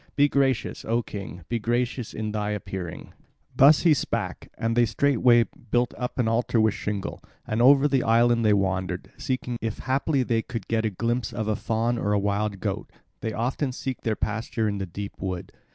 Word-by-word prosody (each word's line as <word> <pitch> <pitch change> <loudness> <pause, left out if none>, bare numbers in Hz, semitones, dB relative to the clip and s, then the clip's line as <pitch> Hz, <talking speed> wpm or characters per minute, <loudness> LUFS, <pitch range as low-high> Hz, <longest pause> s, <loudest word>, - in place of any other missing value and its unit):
Be 145 0 +5
gracious, 135 -4 0
O 115 +1 0
king, 100 -5 -7
be 120 0 -1
gracious 120 +1 -1
in 110 -1 -4
thy 105 -1 -2
appearing." 95 -4 -5 0.4
Thus 145 +3 +7
he 165 -3 +5
spake, 145 - -3
and 115 0 0
they 120 -1 +4
straightway 120 0 +4 0.3
built 120 +2 +1
up 125 -1 -4
an 125 -3 +1
altar 115 +1 +1
with 110 -1 +3
shingle; 100 -1 -4 0.2
and 110 +2 -1
over 140 +3 +7
the 135 -3 +2
island 115 +1 +3
they 105 -1 +5
wandered, 95 -2 -1
seeking 125 -2 -3
if 110 -1 -3
haply 135 +1 0
they 115 -2 +1
could 115 -4 -6
get 115 -1 0
a - - +2
glimpse 115 +5 -1
of 110 -2 -3
a 110 - +1
fawn 115 +3 0
or 105 -2 0
a - - +3
wild 100 0 -1
goat, - - -3 0.3
that 110 - -3
often 130 +4 -1
seek 130 0 -5
their 110 -2 0
pasture 110 +1 -2
in 100 -1 -2
the 95 - -3
deep 100 +4 -7
wood. 95 -2 -4
115 Hz, 195 wpm, -25 LUFS, 105-125 Hz, 0.4 s, Thus